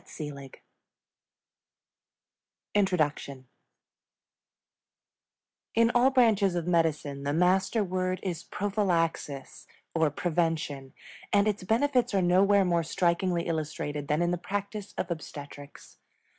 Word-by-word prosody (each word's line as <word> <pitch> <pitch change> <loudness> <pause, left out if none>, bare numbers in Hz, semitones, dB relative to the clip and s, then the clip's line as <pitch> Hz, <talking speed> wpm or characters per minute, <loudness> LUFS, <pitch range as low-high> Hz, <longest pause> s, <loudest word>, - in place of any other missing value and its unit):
INTRODUCTION 150 -9 0 2.3
In 230 +1 +4
all 245 +2 +5
branches 220 -8 +3
of 170 -2 -2
medicine 160 -5 0
the 140 +1 -2
master 190 +6 +2
word 185 0 -2
is 175 -5 -3
prophylaxis, 170 -9 -2 0.3
or 160 -2 +2
prevention, 155 -4 -2 0.4
and 205 0 +4
its 210 -2 -1
benefits 245 +2 +1
are 195 - +3
nowhere 195 +3 +4
more 170 -1 +2
strikingly 170 +1 0
illustrated 150 -3 -3
than 150 +3 +1
in 175 - +1
the 175 - -1
practice 200 +2 -5
of 180 - -3
obstetrics. 145 -3 -9
175 Hz, 100 wpm, -28 LUFS, 155-200 Hz, 2.3 s, all